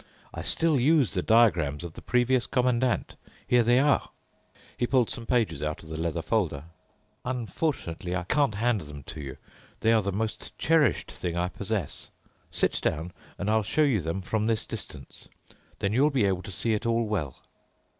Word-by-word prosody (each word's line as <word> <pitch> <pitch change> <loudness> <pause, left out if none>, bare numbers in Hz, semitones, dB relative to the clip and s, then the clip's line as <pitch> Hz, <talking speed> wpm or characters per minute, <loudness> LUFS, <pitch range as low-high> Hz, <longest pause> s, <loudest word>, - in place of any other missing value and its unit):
I - - -5
still 160 -4 +2
use 140 -2 +3
the 90 - 0
diagrams 90 -10 +3
of 85 -2 -7
the - - -10
previous 125 0 +2
Commandant. 125 -1 +1 0.3
Here 125 0 +4
they 120 +2 +4
are." 140 +2 +3 0.7
He 120 - 0
pulled 125 -3 +2
some 115 -1 -4
pages 105 - +1
out 75 +1 -3
of 80 - -12
the 80 0 -4
leather 85 0 -2
folder. 85 -9 0 0.6
"Unfortunately 115 - -2
I 90 - -1
can't 140 +3 +1
hand 115 -1 +1
them 75 -2 -9
to 75 +2 -7
you. 70 -2 -7 0.4
They 115 - +4
are 110 - +4
the 100 0 -2
most 110 +3 -4
cherished 160 -2 +2
thing 85 -1 -4
I 90 +1 0
possess. 100 -4 -3 0.4
Sit - - 0
down, 85 +3 -1 0.2
and 100 - -3
I'll 110 +1 +3
show 155 +9 +1
you 130 -9 +2
them 85 +4 -3
from 110 +3 0
this 115 -1 +1
distance. 75 - -8 0.5
Then 100 +1 -1
you'll 140 +6 +4
be 130 -8 +2
able 95 -2 +1
to 100 - -9
see 110 +5 0
it 110 +2 -1
all 115 0 +2
well." 90 -12 -2
110 Hz, 185 wpm, -27 LUFS, 85-125 Hz, 0.7 s, Here